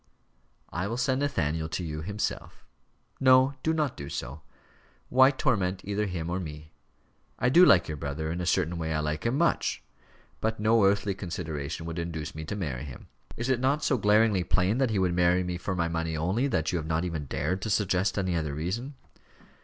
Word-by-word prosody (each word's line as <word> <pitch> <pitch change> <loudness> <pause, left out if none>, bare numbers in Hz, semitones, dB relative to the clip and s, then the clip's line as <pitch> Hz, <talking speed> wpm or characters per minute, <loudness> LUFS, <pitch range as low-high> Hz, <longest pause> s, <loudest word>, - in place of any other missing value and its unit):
"I 90 +4 -2
will 115 +3 -3
send 130 +1 +1
Nathaniel 80 - -1
to 90 - -3
you 75 -2 -4
himself." 100 +5 -4 0.5
"No, 130 +1 +5
do 160 - +1
not 150 -5 0
do 70 0 -7
so. 70 +4 -5 0.7
Why 130 +1 +6
torment 100 -9 0
either 105 +1 -1
him 85 -3 -4
or 90 +2 -2
me? 75 -3 -8 0.7
I 125 - +2
do 170 +8 +7
like 95 - +6
your 75 - -4
brother; 75 +3 -3
in 85 +2 -3
a 90 - -3
certain 90 -2 +1
way 80 -1 -2
I - - +1
like 75 +6 -2
him 125 +4 0
much. 170 +2 +1 0.6
But 110 0 -1
no 110 0 +4
earthly 100 0 +2
consideration 80 -5 -5
would 85 +1 -4
induce 80 -3 -4
me 80 - -6
to 90 - -4
marry 75 -9 -4
him. 65 -4 -11 0.3
Is 115 - -2
it 130 -2 +2
not 135 +4 +1
so 130 - +2
glaringly 105 -2 +4
plain 95 +7 +1
that 135 -3 +2
he 110 - 0
would 90 -2 +2
marry 90 +1 +3
me 90 -1 -3
for 95 +2 -3
my 85 -2 0
money 80 -1 -2
only, 95 - 0
that 80 - 0
you 90 - 0
have 80 - -6
not 80 +2 0
even 80 -4 -3
dared 80 +8 -2
to 110 - -3
suggest 95 -2 +1
any 95 -3 0
other 75 -3 -2
reason?" 110 - -3
90 Hz, 205 wpm, -28 LUFS, 80-110 Hz, 0.7 s, do